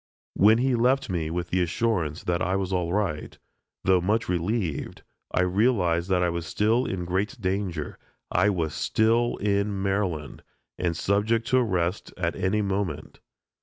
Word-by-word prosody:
When 110 Hz, +3 st, +5 dB
he 130 Hz, +2 st, +1 dB
left 125 Hz, -1 st, +2 dB
me 80 Hz, -3 st, -1 dB
with 85 Hz, 0 st, -4 dB
the 95 Hz, -, +2 dB
assurance 90 Hz, -3 st, -1 dB
that 85 Hz, 0 st, -1 dB
I 95 Hz, +1 st, +1 dB
was 95 Hz, -1 st, -2 dB
all 90 Hz, -2 st, 0 dB
right, 95 Hz, -6 st, -2 dB, 0.5 s
though 95 Hz, -1 st, +4 dB
much 105 Hz, +5 st, 0 dB
relieved, 90 Hz, -, -2 dB, 0.3 s
I -, -, +2 dB
realized 90 Hz, -3 st, +1 dB
that 90 Hz, -1 st, +2 dB
I 90 Hz, -, +2 dB
was 85 Hz, -1 st, -4 dB
still 110 Hz, +8 st, +1 dB
in 90 Hz, -2 st, -3 dB
great 100 Hz, +9 st, -2 dB
danger: 95 Hz, -5 st, -3 dB, 0.3 s
I 105 Hz, -, +3 dB
was 85 Hz, -6 st, -1 dB
still 115 Hz, +2 st, +1 dB
in 100 Hz, 0 st, 0 dB
Maryland, 95 Hz, -7 st, -2 dB, 0.4 s
and 85 Hz, -2 st, -1 dB
subject 110 Hz, +5 st, +1 dB
to 130 Hz, -, +4 dB
arrest 95 Hz, -6 st, 0 dB
at 85 Hz, -2 st, -1 dB
any 105 Hz, +3 st, 0 dB
moment. 95 Hz, -7 st, -3 dB
95 Hz, 160 wpm, -26 LUFS, 85-105 Hz, 0.5 s, When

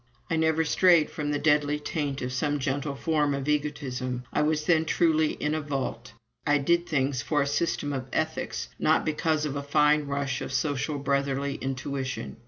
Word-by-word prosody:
I -, -, +2 dB
never 160 Hz, 0 st, +2 dB
strayed 170 Hz, -1 st, +4 dB
from 150 Hz, -3 st, -3 dB
the 145 Hz, -, +1 dB
deadly 150 Hz, 0 st, +2 dB
taint 145 Hz, -2 st, -3 dB
of 125 Hz, 0 st, -3 dB
some 145 Hz, +3 st, 0 dB
gentle 140 Hz, +1 st, -2 dB
form 150 Hz, -1 st, +1 dB
of 140 Hz, 0 st, -4 dB
egotism. 135 Hz, -4 st, -2 dB
I -, -, +2 dB
was 150 Hz, 0 st, +1 dB
then 160 Hz, -1 st, +4 dB
truly 160 Hz, -2 st, +2 dB
in 150 Hz, -, -2 dB
a 155 Hz, -, -1 dB
"vault." 130 Hz, -4 st, -4 dB, 0.3 s
I 145 Hz, 0 st, +3 dB
did 170 Hz, +5 st, +1 dB
things 135 Hz, -4 st, 0 dB
for 145 Hz, +3 st, +1 dB
a -, -, -2 dB
system 145 Hz, 0 st, -1 dB
of 130 Hz, -2 st, -4 dB
ethics, 160 Hz, 0 st, -2 dB
not 155 Hz, -, +3 dB
because 155 Hz, 0 st, 0 dB
of 145 Hz, -2 st, -3 dB
a 140 Hz, -, -2 dB
fine 150 Hz, +1 st, +3 dB
rush 140 Hz, -2 st, -2 dB
of -, -, -5 dB
social 145 Hz, 0 st, -1 dB
brotherly 140 Hz, 0 st, 0 dB
intuition. 130 Hz, -2 st, -4 dB
145 Hz, 185 wpm, -27 LUFS, 140-155 Hz, 0.3 s, strayed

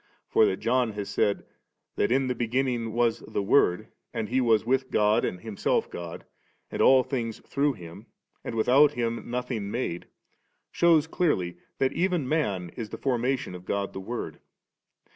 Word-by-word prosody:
For 445 Hz, -1 st, +5 dB
that -, -, 0 dB
John 120 Hz, -1 st, +1 dB
has 100 Hz, -1 st, -5 dB
said, 100 Hz, -, 0 dB, 0.5 s
that 105 Hz, -, +1 dB
in 135 Hz, +1 st, +3 dB
the 125 Hz, -, 0 dB
beginning 120 Hz, -1 st, -1 dB
was 120 Hz, -1 st, +2 dB
the 100 Hz, -, -3 dB
Word, 95 Hz, -4 st, +3 dB, 0.2 s
and 110 Hz, -, -3 dB
He 130 Hz, +2 st, +2 dB
with 125 Hz, +3 st, +2 dB
God 105 Hz, 0 st, +3 dB
and 90 Hz, -, -2 dB
Himself 110 Hz, -3 st, -1 dB
God, 85 Hz, -1 st, -7 dB, 0.5 s
and -, -, -2 dB
all 130 Hz, -1 st, +6 dB
things 115 Hz, -4 st, -3 dB
through 145 Hz, 0 st, +1 dB
Him, 85 Hz, -6 st, -11 dB, 0.4 s
and -, -, -5 dB
without 135 Hz, +6 st, +5 dB
Him 115 Hz, -3 st, -3 dB
nothing 120 Hz, -4 st, -3 dB
made, 100 Hz, -7 st, -3 dB, 0.6 s
shews 165 Hz, -3 st, +4 dB
clearly 95 Hz, -, 0 dB, 0.2 s
that 135 Hz, 0 st, +1 dB
even 175 Hz, -6 st, 0 dB
man 105 Hz, -, 0 dB
is 110 Hz, +5 st, -7 dB
the -, -, -6 dB
formation 125 Hz, -4 st, -1 dB
of 90 Hz, 0 st, -9 dB
God 100 Hz, 0 st, -2 dB
the -, -, -5 dB
Word. 120 Hz, +5 st, -5 dB
120 Hz, 160 wpm, -27 LUFS, 105-135 Hz, 0.6 s, all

